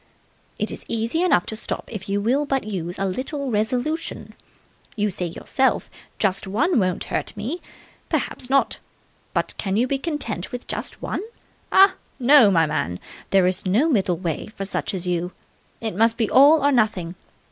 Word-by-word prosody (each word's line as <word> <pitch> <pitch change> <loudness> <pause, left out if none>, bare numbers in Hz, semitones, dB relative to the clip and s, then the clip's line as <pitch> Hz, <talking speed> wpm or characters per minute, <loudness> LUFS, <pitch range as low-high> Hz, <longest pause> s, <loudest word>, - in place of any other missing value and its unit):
"It - - -2
is - - -6
easy 230 +8 -1
enough 355 - +3
to 220 - -3
stop 220 - -4
if 200 -3 -6
you 200 +1 +1
will 255 +7 +2
but 270 -1 0
use 180 -4 -4
a 195 - -1
little 265 +7 -3
resolution. 250 +9 -2 0.6
You 210 -2 0
say 180 -1 -3
to - - -11
yourself, 265 -1 0 0.3
'Just 195 -2 0
one 265 - +2
won't 185 -3 0
hurt - - -2
me!' 255 +13 -4 0.5
Perhaps 250 - -2
not. 275 0 +2 0.6
But - - 0
can 195 -1 -1
you 240 - +3
be 270 +1 -1
content 270 - -3
with 245 0 -6
just - - -3
one? - - -2 0.5
Ah! 385 0 +7 0.2
No, 265 -3 +7
my 165 -4 +4
man, 90 - -2 0.3
there 195 -2 +4
is 185 +2 -1
no 235 - +3
middle 190 - +1
way 165 -3 -3
for 195 - -4
such 195 - -2
as 185 -1 -4
you. 180 0 -1 0.5
It 220 -2 -2
must 225 +3 +3
be 225 -3 +1
all 285 +2 +6
or 285 - +5
nothing. 215 -9 +1
220 Hz, 180 wpm, -23 LUFS, 190-270 Hz, 0.6 s, Ah